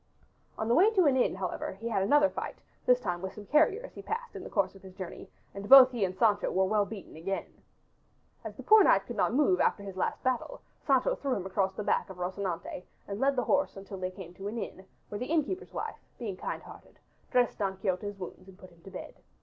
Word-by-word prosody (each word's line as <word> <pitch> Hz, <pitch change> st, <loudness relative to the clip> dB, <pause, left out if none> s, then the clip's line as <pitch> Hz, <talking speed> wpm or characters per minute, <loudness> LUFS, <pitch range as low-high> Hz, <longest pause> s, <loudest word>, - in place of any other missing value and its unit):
On 220 Hz, -, -2 dB
the 235 Hz, -, +3 dB
way 375 Hz, -, +6 dB
to 370 Hz, -3 st, +5 dB
an 280 Hz, -3 st, +4 dB
inn, 255 Hz, -, +2 dB
however, 185 Hz, -1 st, -4 dB
he 215 Hz, +5 st, -7 dB
had 200 Hz, -4 st, +1 dB
another 290 Hz, +9 st, +5 dB
fight, -, -, -5 dB, 0.3 s
this 250 Hz, 0 st, +5 dB
time 180 Hz, -7 st, -3 dB
with 190 Hz, 0 st, -5 dB
some 210 Hz, -, -10 dB
carriers 355 Hz, -, +2 dB
he -, -, -9 dB
passed 470 Hz, +2 st, -5 dB
in -, -, -6 dB
the -, -, -8 dB
course 195 Hz, -3 st, 0 dB
of 195 Hz, -, -15 dB
his 190 Hz, -1 st, -13 dB
journey, 185 Hz, -2 st, -8 dB, 0.2 s
and 200 Hz, +1 st, -7 dB
both 265 Hz, -1 st, +10 dB
he 235 Hz, -5 st, -1 dB
and 185 Hz, -1 st, -2 dB
Sancho 210 Hz, -1 st, +3 dB
were 190 Hz, 0 st, +2 dB
well 205 Hz, +1 st, +2 dB
beaten 205 Hz, -7 st, -9 dB
again. 195 Hz, +5 st, -5 dB, 0.8 s
As -, -, -7 dB
the -, -, -9 dB
poor 430 Hz, -1 st, +7 dB
knight 195 Hz, -, +4 dB
could 240 Hz, -, -6 dB
not 210 Hz, -, +2 dB
move 245 Hz, -8 st, +3 dB
after 200 Hz, -, +1 dB
his 195 Hz, -2 st, -7 dB
last 190 Hz, -, -2 dB
battle 255 Hz, -, -1 dB, 0.3 s
Sancho 265 Hz, -3 st, +3 dB
threw 275 Hz, -3 st, -2 dB
him 190 Hz, -, -4 dB
across 190 Hz, 0 st, 0 dB
the 210 Hz, -, -4 dB
back -, -, 0 dB
of 190 Hz, -, -9 dB
Rocinante 180 Hz, -1 st, -4 dB, 0.3 s
and 200 Hz, +1 st, -5 dB
led 275 Hz, +2 st, +2 dB
the 250 Hz, -, +1 dB
horse 285 Hz, -6 st, +1 dB
until 195 Hz, 0 st, -8 dB
they 185 Hz, 0 st, -2 dB
came 185 Hz, -2 st, -10 dB
to 195 Hz, +2 st, -7 dB
an 220 Hz, +3 st, -4 dB
inn, 190 Hz, -3 st, -6 dB, 0.2 s
where 205 Hz, -, -5 dB
the 250 Hz, -, -3 dB
innkeeper's 330 Hz, +4 st, -1 dB
wife, -, -, -5 dB, 0.2 s
being 210 Hz, -6 st, -4 dB
kind -, -, -5 dB
hearted, -, -, -14 dB, 0.3 s
dressed 245 Hz, -2 st, +2 dB
Don 195 Hz, -2 st, -1 dB
Quixote's 195 Hz, +1 st, -2 dB
wounds 185 Hz, 0 st, -9 dB
and 190 Hz, -1 st, -14 dB
put 185 Hz, -2 st, -14 dB
him 170 Hz, -1 st, -22 dB
to 195 Hz, -, -12 dB
bed. 185 Hz, -, -8 dB
200 Hz, 240 wpm, -30 LUFS, 190-255 Hz, 0.8 s, both